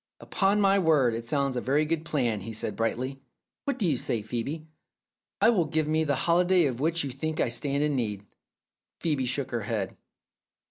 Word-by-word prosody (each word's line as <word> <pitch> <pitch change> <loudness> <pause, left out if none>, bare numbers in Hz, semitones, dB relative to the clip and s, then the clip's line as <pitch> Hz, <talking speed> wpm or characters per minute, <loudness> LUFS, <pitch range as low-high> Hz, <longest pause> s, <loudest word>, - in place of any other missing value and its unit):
"Upon 195 +1 +1
my 195 -1 +4
word, 150 -9 +3
it 115 +1 -5
sounds 140 0 0
a 125 - -1
very 145 +4 +2
good 160 0 -1
plan," 125 -10 0
he 115 +4 -6
said 110 - -3
brightly. 130 +4 -2 0.5
"What 280 - -1
do 200 - +1
you 145 -5 +2
say, 115 -2 -2
Phoebe? 125 +8 -4 0.8
It 235 - +6
will 180 -6 +2
give 155 0 0
me 155 +1 +2
the 145 -2 +1
holiday 175 +1 +4
of 125 -4 -2
which 160 +3 +1
you 140 - -4
think 155 +5 -3
I - - +2
stand 140 +4 -1
in 150 -1 +1
need." 105 -5 -2 0.7
Phcebe 145 -6 0
shook 130 +2 -1
her 120 -1 -1
head. 105 -3 -3
140 Hz, 195 wpm, -27 LUFS, 120-160 Hz, 0.8 s, It